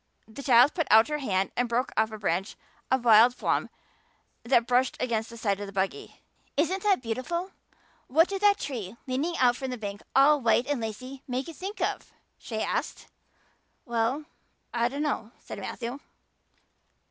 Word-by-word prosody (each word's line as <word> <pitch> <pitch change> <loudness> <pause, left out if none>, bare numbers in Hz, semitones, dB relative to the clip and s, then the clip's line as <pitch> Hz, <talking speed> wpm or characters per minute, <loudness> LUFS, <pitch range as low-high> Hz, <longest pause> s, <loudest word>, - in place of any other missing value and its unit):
The 220 +5 -9
child 255 +1 +5
put 330 - -1
out 220 +5 +6
her 300 0 -1
hand 195 -8 0
and 245 -1 0
broke 245 +3 0
off 220 +1 +2
a 215 - -6
branch 190 -1 -2 0.3
of 260 -2 +1
wild 235 +2 +7
plum - - 0 0.7
that 235 -1 +3
brushed 250 +1 +1
against 225 -2 -1
the 235 - -10
side 200 -4 -1
of 205 - -5
the - - -8
buggy. 190 0 -3 0.4
"Isn't 360 +6 +1
that 395 -9 +2
beautiful? 300 - -3 0.6
What 320 +6 +4
did 395 -1 -4
that 410 -1 +5
tree, 235 - -5
leaning 285 +7 -2
out 245 -1 +4
from 265 -1 -4
the 250 - -4
bank, 205 -2 -6
all 285 +2 +6
white 235 +1 +3
and 285 -4 -2
lacy, 255 +5 -6
make 255 +1 -3
you 330 - -7
think 390 +7 -7
of?" - - -2 0.3
she 220 -2 -4
asked. - - -3 0.8
"Well 235 +4 0
now, - - -18 0.5
I 235 0 +2
dunno," 275 -4 -3
said - - -9
Matthew. 245 +3 -5
250 Hz, 175 wpm, -27 LUFS, 225-285 Hz, 0.8 s, wild